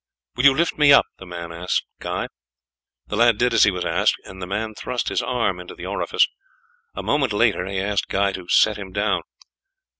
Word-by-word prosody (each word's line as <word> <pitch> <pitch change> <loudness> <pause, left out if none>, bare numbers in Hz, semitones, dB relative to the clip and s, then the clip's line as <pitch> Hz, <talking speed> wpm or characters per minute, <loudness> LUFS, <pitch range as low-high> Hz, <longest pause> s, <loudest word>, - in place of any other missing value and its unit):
"Will 125 - 0
you 135 -1 +7
lift 170 -1 0
me 145 -1 +6
up?" 140 - +7
the 95 - -11
man 85 -1 -7
said 85 +2 -8
to - - +2 0.2
Guy. - - -3 0.8
The - - -5
lad 115 0 +4
did 125 +1 +1
as - - +6
he - - +4
was 90 -2 -3
asked, - - +2
and 95 0 -11
the 90 - -5
man 110 +3 -3
thrust 120 +2 -3
his - - 0
arm 115 -7 -1
into 90 - -10
the - - -9
orifice. - - +1 0.7
A 95 - -5
moment 130 +2 +1
later 105 -4 +1
he 100 0 -4
asked 100 +1 -1
Guy 100 0 +1
to 90 -2 -8
set 110 -1 +4
him 95 -2 -8
down. 100 -3 0
100 Hz, 215 wpm, -22 LUFS, 95-120 Hz, 0.8 s, you